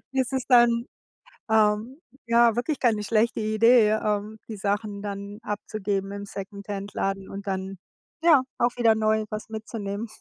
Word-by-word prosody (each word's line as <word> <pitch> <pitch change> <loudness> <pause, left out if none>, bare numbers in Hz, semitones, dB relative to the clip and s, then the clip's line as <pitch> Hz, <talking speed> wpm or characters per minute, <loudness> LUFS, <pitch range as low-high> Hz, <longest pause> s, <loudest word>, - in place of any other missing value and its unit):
ist 265 0 0
es 260 -1 -2
dann, 240 -1 +4 0.6
ähm, 220 +5 +2 0.3
ja 235 -1 +4
wirklich 265 +5 -1
keine 220 -4 +2
schlechte 225 +2 +1
Idee, 215 +1 +4
ähm, 210 +1 -2
die 220 - -6
Sachen 205 +1 -2
dann 200 0 -6
abzugeben 205 -2 -3
im 200 0 -6
Secondhand-Laden 195 0 -5
und 200 +1 -8
dann, 190 0 -3 0.5
ja, 310 -6 +6 0.2
auch 240 - +3
wieder 230 -2 +4
neu 220 0 +1
was 215 +1 -5
mitzunehmen. 220 -1 -5
215 Hz, 140 wpm, -25 LUFS, 200-235 Hz, 0.6 s, ja